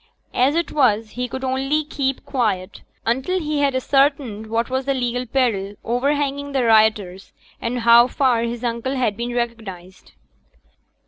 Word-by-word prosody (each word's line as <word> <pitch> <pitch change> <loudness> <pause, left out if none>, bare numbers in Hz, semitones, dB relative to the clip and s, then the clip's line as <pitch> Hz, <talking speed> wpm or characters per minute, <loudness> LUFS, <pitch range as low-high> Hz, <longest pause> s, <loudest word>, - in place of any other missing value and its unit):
As 265 +5 +2
it 340 0 -1
was, 225 -6 +2
he 250 0 -3
could 260 +2 -6
only 270 +4 0
keep 275 -3 -2
quiet 210 -7 -2 0.2
until 265 +11 0
he 300 -3 -2
had 280 -2 +1
ascertained 270 -5 +1
what 230 +1 -1
was 260 0 -2
the 275 0 0
legal 245 0 -2
peril 220 -6 0
overhanging 280 +3 -1
the 265 -2 +1
rioters, 215 -4 +2 0.3
and 240 +1 -2
how 235 +1 +7
far 255 -3 +1
his 235 +1 -4
uncle 240 +3 -2
had 245 -6 0
been 240 +2 -4
recognized. 215 -7 -6
245 Hz, 150 wpm, -21 LUFS, 225-270 Hz, 0.3 s, how